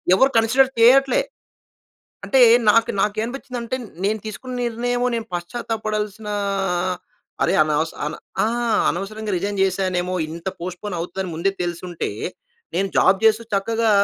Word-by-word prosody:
ఎవరు 265 Hz, +7 st, +5 dB
కన్సిడర్ 255 Hz, +4 st, +4 dB
చేయట్లే. 270 Hz, -, +6 dB, 1.0 s
అంటే 265 Hz, -, +3 dB, 0.3 s
నాకు 230 Hz, +1 st, +3 dB
నాకు 210 Hz, +1 st, +1 dB
ఏం -, -, -1 dB
అనిపించిందంటే, 250 Hz, -1 st, -5 dB, 0.3 s
నేను 215 Hz, +2 st, +1 dB
తీసుకున్న 250 Hz, +4 st, -6 dB
నిర్ణయము 245 Hz, +1 st, -1 dB
నేను 230 Hz, -1 st, -3 dB
పశ్చాత్తాప 225 Hz, +6 st, -3 dB
పడాల్సినా 210 Hz, 0 st, -3 dB, 1.1 s
అరే, -, -, +2 dB
అనవస 155 Hz, +1 st, 0 dB
అన 150 Hz, -, -3 dB, 0.3 s
ఆ! -, -, +3 dB, 0.4 s
అనవసరంగా 210 Hz, +3 st, -3 dB
రిజైన్ 200 Hz, +2 st, -2 dB
చేశానేమో! 185 Hz, -1 st, 0 dB, 0.2 s
ఇంత 170 Hz, +3 st, -5 dB
పోస్ట్‌పోన్ 180 Hz, +2 st, -5 dB
అవుతుందని 180 Hz, +2 st, -4 dB
ముందే 170 Hz, +5 st, +1 dB
తెలిసుంటే, 175 Hz, 0 st, -4 dB, 0.6 s
నేను 195 Hz, +1 st, +1 dB
జాబ్ 190 Hz, +1 st, +5 dB
చేస్తూ 220 Hz, +1 st, +4 dB
చక్కగా 225 Hz, +3 st, +1 dB
210 Hz, 130 wpm, -22 LUFS, 185-230 Hz, 1.1 s, చేయట్లే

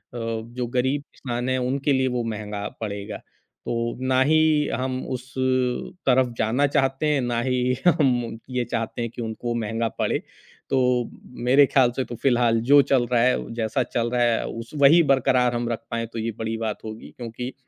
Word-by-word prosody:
जो 115 Hz, +1 st, -4 dB
गरीब 130 Hz, +3 st, 0 dB
इंसान 125 Hz, -1 st, -3 dB
है 130 Hz, -, +1 dB
उनके 135 Hz, +3 st, 0 dB
लिए 130 Hz, 0 st, +2 dB
वो 125 Hz, -2 st, -1 dB
महँगा 105 Hz, -1 st, -4 dB
पड़ेगा, 100 Hz, -2 st, -4 dB
तो 115 Hz, 0 st, -6 dB
ना 130 Hz, 0 st, +3 dB
ही 155 Hz, +1 st, +3 dB
हम 130 Hz, 0 st, -2 dB
उस 130 Hz, 0 st, -6 dB, 0.7 s
तरफ़ 130 Hz, -1 st, +4 dB
जाना 125 Hz, +6 st, +2 dB
चाहते 135 Hz, +1 st, +1 dB
हैं, 145 Hz, -3 st, +2 dB
ना 120 Hz, -1 st, -1 dB
ही 125 Hz, 0 st, +1 dB
हम 125 Hz, -8 st, +2 dB
ये 125 Hz, -1 st, -1 dB
चाहते 115 Hz, +1 st, -2 dB
हैं 115 Hz, -1 st, -3 dB
कि 120 Hz, -, -7 dB
उनको 115 Hz, +1 st, -3 dB
महँगा 115 Hz, 0 st, -1 dB
पड़े। -, -, +1 dB, 0.5 s
तो 125 Hz, -2 st, +2 dB, 0.4 s
मेरे 135 Hz, +3 st, +6 dB
ख़्याल 130 Hz, -2 st, +3 dB
से 130 Hz, -, 0 dB
तो 120 Hz, -, -7 dB
फ़िलहाल 120 Hz, -2 st, +2 dB
जो 145 Hz, -, +9 dB
चल 135 Hz, -3 st, +2 dB
रहा 120 Hz, -1 st, +3 dB
है, 125 Hz, -1 st, +1 dB
जैसा 115 Hz, +2 st, 0 dB
चल 120 Hz, 0 st, -2 dB
रहा 125 Hz, -1 st, +1 dB
है, 115 Hz, -1 st, +1 dB
उस 115 Hz, 0 st, -7 dB
वही 155 Hz, +5 st, +7 dB
बरकरार 125 Hz, -2 st, +2 dB
हम 120 Hz, 0 st, -2 dB
रख 115 Hz, -, -3 dB
पाएँ 115 Hz, 0 st, -1 dB
तो 115 Hz, -, -4 dB
ये 115 Hz, +1 st, -2 dB
बड़ी 110 Hz, 0 st, -2 dB
बात 110 Hz, -2 st, -4 dB
होगी 110 Hz, +1 st, -8 dB
क्योंकि, 125 Hz, +1 st, -6 dB
125 Hz, 185 wpm, -24 LUFS, 115-130 Hz, 0.7 s, जो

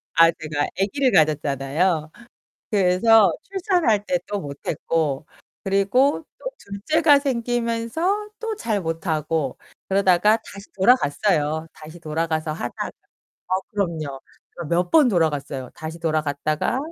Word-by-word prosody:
아 165 Hz, 0 st, +7 dB
제가 150 Hz, -2 st, -3 dB
아기를 260 Hz, +7 st, +1 dB
가졌잖아요. 155 Hz, -, +1 dB, 0.6 s
그래서 200 Hz, 0 st, +5 dB
출산할 355 Hz, -, +1 dB
때 270 Hz, -1 st, +1 dB
또 205 Hz, -, -3 dB
못 140 Hz, -3 st, -7 dB
했고. 155 Hz, -2 st, -1 dB, 0.4 s
그리고 200 Hz, +11 st, +2 dB
또 -, -, -15 dB
둘째가 295 Hz, -, +2 dB
생기면서 245 Hz, -, -1 dB
또 450 Hz, -2 st, -3 dB
잘 215 Hz, -, -1 dB
못 165 Hz, 0 st, -4 dB
하고. 155 Hz, -3 st, -1 dB, 0.3 s
그러다가 195 Hz, +2 st, +4 dB
다시 200 Hz, +1 st, -11 dB
돌아갔어요. 165 Hz, -, +2 dB
다시 155 Hz, +2 st, -12 dB
돌아가서 160 Hz, 0 st, -2 dB
하다가 120 Hz, -6 st, -4 dB, 0.6 s
어, 185 Hz, -, +1 dB, 0.2 s
그럼요. 160 Hz, -9 st, -3 dB, 0.4 s
그 170 Hz, -, -6 dB
몇 175 Hz, +1 st, +1 dB
번 305 Hz, -5 st, +6 dB
돌아갔어요. 145 Hz, -, -1 dB
다시 160 Hz, +2 st, -7 dB
돌아갔다가 155 Hz, -, -1 dB
180 Hz, 275 characters per minute, -22 LUFS, 155-230 Hz, 0.6 s, 아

